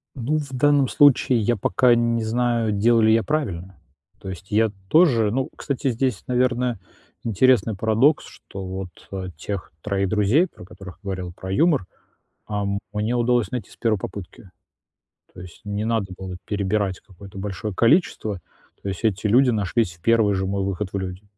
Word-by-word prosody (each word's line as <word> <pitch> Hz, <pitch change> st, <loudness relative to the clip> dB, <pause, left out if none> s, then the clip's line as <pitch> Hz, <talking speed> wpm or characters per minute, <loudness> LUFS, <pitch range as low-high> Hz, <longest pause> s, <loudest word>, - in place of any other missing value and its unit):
Ну, 140 Hz, +4 st, -1 dB
в 140 Hz, -3 st, -7 dB
данном 140 Hz, 0 st, +3 dB
случае 135 Hz, -4 st, +4 dB
я 120 Hz, +2 st, +1 dB
пока 125 Hz, +4 st, +3 dB
не 115 Hz, -1 st, +1 dB
знаю, 115 Hz, -1 st, 0 dB
делаю 110 Hz, +2 st, +3 dB
ли 110 Hz, -, +5 dB
я 115 Hz, 0 st, +3 dB
правильно. 95 Hz, -, -3 dB, 0.4 s
То 95 Hz, -, -7 dB
есть 95 Hz, +1 st, -9 dB
я 110 Hz, 0 st, +2 dB, 0.2 s
тоже 130 Hz, -, +4 dB
ну, 130 Hz, +5 st, -1 dB
кстати, 140 Hz, -1 st, -2 dB
здесь, 120 Hz, -2 st, -1 dB
наверное, 125 Hz, -2 st, +1 dB, 0.5 s
интересный 115 Hz, 0 st, +3 dB
парадокс, 110 Hz, +8 st, +2 dB
что 95 Hz, -1 st, -10 dB
вот, 95 Hz, -1 st, -8 dB
а, 95 Hz, -1 st, -4 dB
тех 100 Hz, +2 st, -5 dB
3 100 Hz, 0 st, -1 dB
друзей, 110 Hz, -, +3 dB
про -, -, -15 dB
которых 95 Hz, -1 st, -12 dB
говорил, 95 Hz, -3 st, -5 dB
про 95 Hz, +1 st, -7 dB
юмор, 145 Hz, -, +2 dB, 0.6 s
а, 105 Hz, -1 st, -2 dB, 0.3 s
мне 105 Hz, +3 st, -1 dB
удалось 120 Hz, 0 st, +1 dB
найти 125 Hz, -3 st, -4 dB
с -, -, -16 dB
1 115 Hz, -3 st, +1 dB
попытки. 95 Hz, -1 st, -8 dB, 0.8 s
То -, -, -11 dB
есть 90 Hz, -2 st, -12 dB
не 105 Hz, +1 st, -3 dB
надо 110 Hz, -5 st, -1 dB
было 95 Hz, -1 st, -7 dB
перебирать 100 Hz, -2 st, -1 dB
какое-то 95 Hz, 0 st, -14 dB
большое 100 Hz, +1 st, -4 dB
количество. 115 Hz, -, +2 dB, 0.5 s
То -, -, -7 dB
есть 95 Hz, -, -6 dB
эти 105 Hz, -1 st, +1 dB
люди 125 Hz, +5 st, +5 dB
нашлись 105 Hz, -2 st, 0 dB
в 85 Hz, -, -28 dB
1 110 Hz, -1 st, +3 dB
же 95 Hz, -, -1 dB
мой 100 Hz, 0 st, -1 dB
выход 95 Hz, 0 st, -3 dB
в 100 Hz, -, -1 dB
люди. 95 Hz, +1 st, -5 dB
110 Hz, 170 wpm, -23 LUFS, 95-120 Hz, 0.8 s, ли